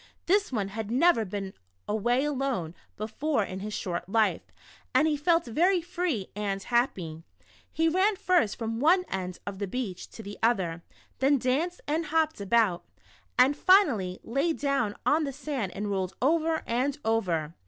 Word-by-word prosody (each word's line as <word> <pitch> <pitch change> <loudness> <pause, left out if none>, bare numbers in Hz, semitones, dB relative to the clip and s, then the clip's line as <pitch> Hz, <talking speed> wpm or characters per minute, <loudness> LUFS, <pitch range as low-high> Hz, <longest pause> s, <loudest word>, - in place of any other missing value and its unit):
This 400 0 +2
one 205 -5 -1
had 215 +1 -5
never 250 -1 +3
been 195 0 -5 0.3
away 240 +5 +1
alone 265 - -2 0.2
betbre 220 +2 -1
in 185 - -6
his 210 +2 -5
short 175 0 -4
life, 220 +1 +2 0.5
and 310 - +5
he 305 - +2
felt 330 +3 +2
ver} 350 - +2
free 345 - -2
and 200 -2 -2
happy. 185 -10 -1 0.5
He 325 0 +1
ran 380 +6 +3
first 360 - +2
from 225 0 -3
one 360 +7 +4
end 185 -2 -4
of 200 -1 -6
the 200 - -2
beach 205 -4 -4
to 225 - -9
the 205 0 -8
other, 185 -8 +1 0.4
then 275 +2 +4
danced 285 +8 -1
and 315 +2 -1
hopped 315 -5 +1
about, 200 -4 +2 0.5
and 260 +3 +5
finally 280 - +3
lay 275 +8 0
down 275 -9 0
on 310 +2 +3
the 280 - -2
sand 270 -8 -4
and 205 +1 -3
rolled 190 -1 -2
over 320 +3 +1
and 260 +5 0
over. 175 -9 0
240 Hz, 165 wpm, -28 LUFS, 200-310 Hz, 0.5 s, and